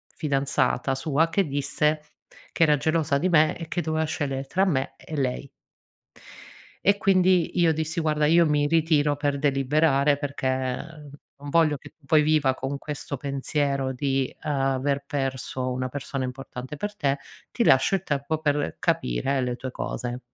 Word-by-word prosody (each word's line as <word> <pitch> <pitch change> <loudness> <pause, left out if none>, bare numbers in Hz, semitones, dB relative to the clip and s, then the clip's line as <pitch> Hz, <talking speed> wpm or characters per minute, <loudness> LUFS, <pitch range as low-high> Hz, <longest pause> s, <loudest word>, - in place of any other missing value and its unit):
fidanzata 140 -2 0
sua 155 +3 +1
che 195 +2 +1
disse 150 +2 0 0.5
che - - +2
era 150 -2 +4
gelosa 155 -1 +1
di 185 +5 +1
me 155 -2 +4
e 165 -1 -7
che 175 - -2
doveva 160 -1 -1
scegliere 140 -3 -3
tra 190 +8 +1
me 135 -8 0
e 155 - -8
lei. 135 +1 -2 1.4
E 200 +1 +5
quindi 185 -3 +3
io 165 -2 +4
dissi: 160 +2 -2
"Guarda 150 -1 +1
io 170 +2 +5
mi 145 -1 +2
ritiro 150 -2 +2
per 145 -1 -1
deliberare 140 +1 +2
perché 140 -2 -3 0.9
non 145 0 -8
voglio 155 -1 +3
che - - -15
poi 155 +2 +4
viva 150 -3 +3
con 135 +2 -4
questo 145 -1 -5
pensiero 140 0 -1
di 135 0 -1
aver 135 0 0
perso 135 -2 -3
una 130 0 -2
persona 135 0 -4
importante 130 +1 -6
per 205 +5 -4
te, 140 -6 0 0.3
ti 240 - 0
lascio 135 +2 +4
il 190 - -3
tempo 150 0 -2
per 145 -2 -1
capire 130 - 0
le 125 -1 -1
tue 130 +1 -6
cose". 125 0 -4
145 Hz, 155 wpm, -25 LUFS, 135-160 Hz, 1.4 s, E